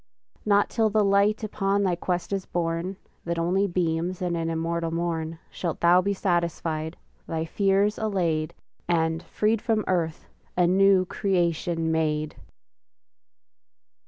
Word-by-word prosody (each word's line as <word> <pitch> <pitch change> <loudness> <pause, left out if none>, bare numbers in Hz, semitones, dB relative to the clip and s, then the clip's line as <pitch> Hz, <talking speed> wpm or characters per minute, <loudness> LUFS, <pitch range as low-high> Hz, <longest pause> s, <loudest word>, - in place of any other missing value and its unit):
Not 205 0 +3
till 225 -2 +2
the 210 0 +2
light 200 +2 +3
upon 200 -1 0
thy 185 -3 +1
quest 180 +2 -2
is 195 -1 -3
born, 170 +2 -2 0.3
That 170 0 -2
only 180 +4 +1
beams 175 0 -1
in 180 -2 -1
an 165 -1 -1
immortal 165 +1 -1
morn, 165 -1 -2
Shalt 170 -3 -3
thou 175 +1 +5
be 200 +2 0
satisfied, 170 -3 -1 0.3
thy 160 0 -2
fears 200 +3 +1
allayed, 170 -8 -1 0.3
And, 160 -1 +1
freed 215 +3 0
from 225 -3 +1
earth, 165 -3 -1 0.3
a 180 - +4
new 190 +1 +4
creation 170 -4 0
made! 155 -1 0
175 Hz, 130 wpm, -26 LUFS, 165-195 Hz, 0.3 s, thou